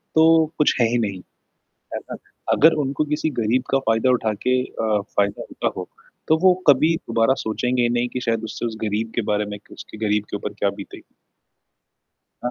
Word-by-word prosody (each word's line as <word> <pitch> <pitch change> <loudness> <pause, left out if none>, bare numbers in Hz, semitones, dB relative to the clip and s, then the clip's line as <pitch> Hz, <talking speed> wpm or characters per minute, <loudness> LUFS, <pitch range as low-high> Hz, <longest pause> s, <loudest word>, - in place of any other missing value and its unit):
तो 160 0 +6
कुछ 150 - +3
है 115 - +5
ही 120 - +2
नहीं। 100 -4 -2 0.7
है - - -2
ना? - - -9 0.4
अगर 160 +2 +6
उनको 140 +3 -1
किसी 150 +1 -1
गरीब 120 +4 +1
का 135 - +3
फ़ायदा 115 +3 +3
उठाके 125 +2 +1
अ, 110 -4 -1
फ़ायदा 100 -1 -1
होता - - -2
हो - - -5 0.4
तो 160 - +4
वो 185 -1 +7
कभी 155 +4 +5
दोबारा 115 -3 +1
सोचेंगे 125 +2 0
नहीं 120 0 0
कि 125 - -4
शायद 115 -1 0
उससे 110 +2 -5
उस 115 -2 -3
गरीब 110 +1 -2
के 120 - +1
बारे 105 0 +1
में 105 0 -6
उसके - - -11
गरीब 105 0 +1
के - - -2
ऊपर - - -6
क्या - - +2
बीतेगी। - - -10 1.4
ना 125 - 0
120 Hz, 185 wpm, -22 LUFS, 110-135 Hz, 1.4 s, वो